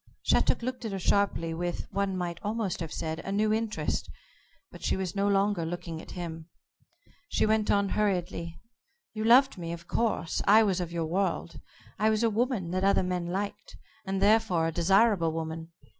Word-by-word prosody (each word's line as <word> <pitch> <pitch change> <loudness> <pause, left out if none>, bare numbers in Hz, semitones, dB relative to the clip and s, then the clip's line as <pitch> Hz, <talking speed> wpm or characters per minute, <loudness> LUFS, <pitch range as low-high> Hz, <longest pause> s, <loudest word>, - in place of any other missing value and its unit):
Shattuck - - +2
looked 255 0 -4
at 220 -3 -4
her - - -2
sharply, 185 -3 +1
with, 175 +1 -3
one 195 -1 -1
might 175 -1 -3
almost 210 -3 -2
have 165 -3 -5
said, 160 0 -3
a 195 - -5
new 215 +2 +2
interest, 220 0 -2 0.6
but - - -12
she - - +1
was 190 -1 -3
no 200 0 +1
longer 200 -2 +2
looking 165 -1 -5
at - - -14
him. 165 -1 -6 0.8
She - - +1
went 215 0 +1
on, 200 -1 +2
hurriedly: 180 -4 -1 0.5
"You 215 -1 -3
loved 245 0 +5
me, 170 -1 -4
of 170 0 -8
course. 220 -7 0
I 215 +3 +7
was 190 -3 +1
of 175 -1 -4
your 170 -1 -2
world. 190 +5 -2 0.4
I 215 - +3
was 220 +1 +1
a 230 - +3
woman 220 -6 -1
that 185 +1 -1
other 195 -1 +3
men 180 -1 -2
liked, 195 +3 -4 0.3
and 195 0 -2
therefore 200 -4 +3
a 165 - 0
desirable 190 +1 +3
woman. 160 +1 -5
190 Hz, 185 wpm, -28 LUFS, 170-215 Hz, 0.8 s, I